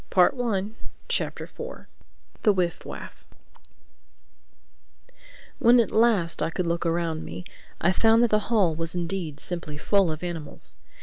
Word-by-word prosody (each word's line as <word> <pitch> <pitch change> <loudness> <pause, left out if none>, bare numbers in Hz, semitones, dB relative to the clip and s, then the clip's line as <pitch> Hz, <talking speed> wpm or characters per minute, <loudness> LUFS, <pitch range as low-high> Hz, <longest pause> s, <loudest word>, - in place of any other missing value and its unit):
THE - - -14
FOURTH 205 +1 +3 0.4
CHAPTER - - -1 0.9
THE 215 - +5
WIFF 180 -3 -1
WAFF - - -9 2.4
WHEN 240 +1 +6
at 230 - +2
last 215 -8 +3
I - - +1
could 175 +2 -2
look 170 0 0
around 165 -1 -1
me 90 +2 -7 0.4
I 170 - +3
found 225 +4 +4
that 235 - +2
the 215 - +4
hall 200 -8 +3
was 165 +2 -4
indeed 170 -4 -3
simply 170 -4 -4
full 195 +2 +2
of 155 +2 -6
animals. 165 -4 -5
175 Hz, 135 wpm, -26 LUFS, 165-210 Hz, 2.4 s, WHEN